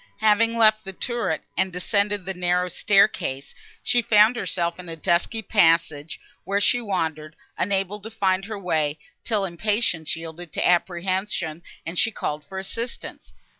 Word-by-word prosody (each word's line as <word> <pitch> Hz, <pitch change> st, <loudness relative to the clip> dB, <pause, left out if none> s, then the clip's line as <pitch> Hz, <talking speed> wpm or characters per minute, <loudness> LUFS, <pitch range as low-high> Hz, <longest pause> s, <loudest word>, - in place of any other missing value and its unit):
Having 225 Hz, +2 st, +3 dB
left 215 Hz, -1 st, +5 dB
the 195 Hz, -, -6 dB
turret, 235 Hz, -6 st, -2 dB
and 190 Hz, -, 0 dB
descended 200 Hz, +2 st, 0 dB
the 190 Hz, -, -3 dB
narrow 180 Hz, 0 st, 0 dB
staircase, 175 Hz, -9 st, +1 dB, 0.3 s
she 240 Hz, -, +2 dB
found 215 Hz, +1 st, +5 dB
herself 175 Hz, -6 st, -2 dB
in 180 Hz, -1 st, -8 dB
a 165 Hz, -, -5 dB
dusky 175 Hz, +7 st, 0 dB
passage, 165 Hz, -3 st, +2 dB, 0.2 s
where 200 Hz, +1 st, 0 dB
she 245 Hz, +4 st, +3 dB
wandered, 160 Hz, -7 st, -3 dB, 0.2 s
unable 195 Hz, +1 st, 0 dB
to 215 Hz, +2 st, -8 dB
find 195 Hz, -3 st, 0 dB
her 215 Hz, 0 st, -5 dB
way, 155 Hz, -6 st, 0 dB, 0.3 s
till 210 Hz, -4 st, 0 dB
impatience 185 Hz, -3 st, -1 dB
yielded 165 Hz, 0 st, -8 dB
to -, -, +1 dB
apprehension, 180 Hz, -1 st, 0 dB, 0.2 s
and 165 Hz, +2 st, -2 dB
she -, -, +4 dB
called 150 Hz, -8 st, -4 dB
for 190 Hz, -, -9 dB
assistance. 230 Hz, +5 st, -6 dB
190 Hz, 150 wpm, -24 LUFS, 170-210 Hz, 0.3 s, left